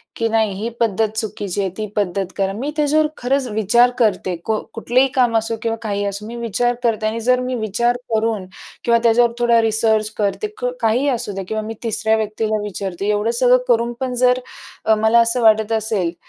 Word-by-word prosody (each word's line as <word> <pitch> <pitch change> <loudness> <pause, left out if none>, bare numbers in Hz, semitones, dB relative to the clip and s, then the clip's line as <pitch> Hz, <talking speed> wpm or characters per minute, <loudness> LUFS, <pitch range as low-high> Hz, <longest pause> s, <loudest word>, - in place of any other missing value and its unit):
की 230 - 0
नाही 220 -2 +1
ही 225 - -2
पद्धत 220 -1 +1
चुकीची 205 -3 -3
आहे, 195 - -1
ती 215 -1 -3
पद्धत 195 -2 -1
करा. 195 0 0
मी 265 +8 -4
त्याच्यावर 305 +1 +3
खरंच 260 +1 0
विचार 220 +4 +3
करते. 190 -5 +1
को 220 -1 0
कुठलेही 245 +4 +2
काम 240 -3 +3
असो 225 +1 -1
किंवा 225 0 -1
काहीही 205 -1 -2
असो. 200 +1 -4
मी 235 - -7
विचार 240 +1 0
करते 220 -2 +1
आणि 225 +1 -2
जर 250 0 +4
मी 255 - -2
विचार 235 +2 0 0.2
करून 220 -3 0 0.4
किंवा 235 -1 +3
त्याच्यावर 235 0 +4
थोडा 235 -1 +4
रिसर्च 220 -1 +1
करते. 210 - -1
क - - -2
काहीही 245 +6 +2
असू 240 -4 -2
द्या 195 -1 -5
किंवा 220 0 -1
मी 225 +1 -5
तिसऱ्या 220 0 +1
व्यक्तीला 215 0 -1
विचारते. 195 -1 -4
एवढं 210 +2 +1
सगळं 250 0 +6
करून 235 -1 +2
पण 260 -1 -2
जर 250 0 +4 0.5
अ, 220 - +4
मला 220 +2 +4
असं 235 +1 +2
वाटत 220 -1 +4
असेल, 215 -6 0
225 Hz, 195 wpm, -19 LUFS, 210-240 Hz, 0.5 s, सगळं